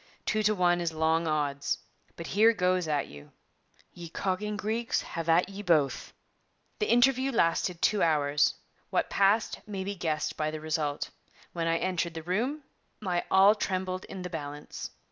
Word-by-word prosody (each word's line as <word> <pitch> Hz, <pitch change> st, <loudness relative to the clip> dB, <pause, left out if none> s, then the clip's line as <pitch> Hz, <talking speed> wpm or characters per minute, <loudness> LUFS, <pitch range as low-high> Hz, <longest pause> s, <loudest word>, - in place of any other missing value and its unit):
Two 215 Hz, -, +1 dB
to 215 Hz, 0 st, +2 dB
one 175 Hz, -2 st, +2 dB
is 170 Hz, -1 st, -1 dB
long 160 Hz, +1 st, +1 dB
odds. 145 Hz, -2 st, 0 dB, 0.4 s
But 170 Hz, -, -7 dB
here 220 Hz, +6 st, +4 dB
goes 180 Hz, -3 st, +1 dB
at 145 Hz, -2 st, 0 dB
you: 75 Hz, 0 st, -13 dB, 0.6 s
"Ye 170 Hz, -1 st, -9 dB
cogging 200 Hz, +4 st, -2 dB
Greeks, 225 Hz, +3 st, -1 dB
have 165 Hz, 0 st, -5 dB
at 170 Hz, +2 st, +4 dB
ye 200 Hz, +1 st, -7 dB
both." 160 Hz, -8 st, +1 dB, 0.7 s
The 425 Hz, -, 0 dB
interview 260 Hz, +2 st, +4 dB
lasted 170 Hz, -4 st, +1 dB
two 210 Hz, -2 st, +3 dB
hours. 145 Hz, -2 st, +2 dB, 0.3 s
What -, -, 0 dB
passed 200 Hz, +3 st, +2 dB
may 195 Hz, -2 st, -4 dB
be 200 Hz, +1 st, -3 dB
guessed 160 Hz, -5 st, -2 dB
by 155 Hz, 0 st, -1 dB
the 155 Hz, 0 st, -5 dB
result. 155 Hz, -2 st, -2 dB, 0.4 s
When 165 Hz, -1 st, -2 dB
I 165 Hz, 0 st, +2 dB
entered 170 Hz, -2 st, -1 dB
the 160 Hz, -, -5 dB
room, 240 Hz, -, -1 dB, 0.4 s
my 180 Hz, -4 st, -1 dB
all 195 Hz, +2 st, +7 dB
trembled 185 Hz, -3 st, -2 dB
in 190 Hz, -2 st, -7 dB
the 180 Hz, -, -5 dB
balance. 145 Hz, -2 st, -6 dB
175 Hz, 165 wpm, -29 LUFS, 160-205 Hz, 0.7 s, all